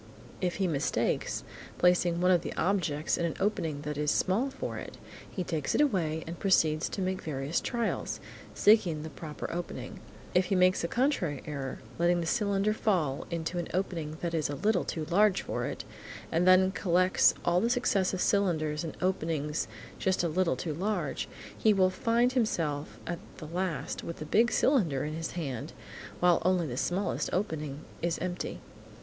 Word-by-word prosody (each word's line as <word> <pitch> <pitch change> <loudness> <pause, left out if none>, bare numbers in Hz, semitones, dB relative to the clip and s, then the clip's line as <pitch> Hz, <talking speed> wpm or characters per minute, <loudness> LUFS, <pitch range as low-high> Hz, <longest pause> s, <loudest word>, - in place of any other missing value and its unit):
If 180 -2 0
he 195 - 0
mistakes, 155 -6 0 0.3
placing 175 -1 +3
one 180 +1 +4
of 175 -2 +4
the - - -5
objects 165 -5 0
in 170 - +1
an 160 - -4
opening 165 -8 -1
that 150 -1 -3
is 150 0 +1
small 205 - +2
for - - -5
it, - - -9 0.3
he 185 - -3
takes 155 -4 -1
it - - +4
away, 170 - +1
and 170 +1 -7
proceeds 160 -5 +3
to 195 - -3
make 185 0 -1
various 145 +1 -2
trials, 235 -2 -2 0.4
seeking 180 -8 +4
the 160 - -7
proper 150 -1 -6
opening. 175 0 -5 0.3
If 180 +1 +4
he 190 - 0
makes 185 -1 +4
a - - +1
contrary 190 - 0
error, 140 -4 -5 0.2
letting 175 +1 +3
the 170 - -2
cylinder 200 +1 +1
fall 170 -11 0
into 170 +1 -2
an 170 - -3
opening 165 -5 -2
that 170 -1 -2
is 155 -3 0
a 145 - -2
little 205 +3 +1
too 160 -2 -3
large 195 +3 +3
for - - -2
it, - - -4 0.5
and 170 +2 +2
then 185 +1 +6
collects 185 0 +3
all 175 +1 +3
the 230 - +2
successive 195 -7 +1
cylinders 160 -6 +1
in 165 - -5
openings 160 -5 -1 0.3
just 190 -1 +1
a - - +2
little 170 -2 +1
too 155 +4 -3
large, 180 -3 -2 0.3
he 215 - +4
will 185 -1 +4
find 235 +5 +2
himself 165 - -1
at 170 0 -3 0.2
the - - -8
last 165 -3 -3
with 170 - -5
the 155 - -6
big 230 +9 +3
cylinder 175 - +2
in 150 - -3
his 165 +1 -4
hand 140 -9 -4 0.5
while 175 -1 +4
only 180 -1 +2
the 125 -5 -4
smallest 180 +9 -1
opening 155 -7 -2 0.2
is 170 0 0
empty. 180 -1 -4
175 Hz, 180 wpm, -30 LUFS, 155-190 Hz, 0.5 s, then